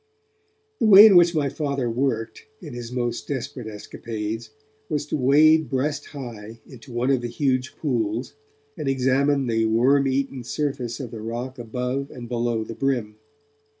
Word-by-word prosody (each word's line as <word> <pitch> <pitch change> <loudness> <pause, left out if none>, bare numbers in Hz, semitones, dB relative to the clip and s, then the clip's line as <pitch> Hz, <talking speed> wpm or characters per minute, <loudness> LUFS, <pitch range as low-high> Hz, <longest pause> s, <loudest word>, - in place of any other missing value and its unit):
The 225 - +3
way 205 0 +10
in 210 -4 +7
which 175 -1 +6
my 145 -2 +1
Father 140 -3 -2
worked, 115 -2 -2
in - - -9
his 120 -1 -7
most 120 -1 -3
desperate 130 -3 -5
escapades, 110 +1 -6 0.4
was 145 -1 -1
to - - -3
wade 155 +3 +4
breast 145 +2 -2
high 115 -5 -9
into 125 -2 -13
one 120 +3 0
of 130 -3 +2
the 120 - -3
huge 130 +1 -1
pools, 120 -5 -2 0.4
and - - -5
examine 135 +1 +2
the 115 -2 +1
worm 130 +5 +3
eaten 135 -1 -1
surface 125 -3 -3
of 125 -4 -6
the 110 - -7
rock 120 +4 -5
above 125 +4 -3
and 120 -2 -9
below 120 -1 -1
the 115 - -7
brim. 120 -5 -2
125 Hz, 160 wpm, -23 LUFS, 115-140 Hz, 0.4 s, way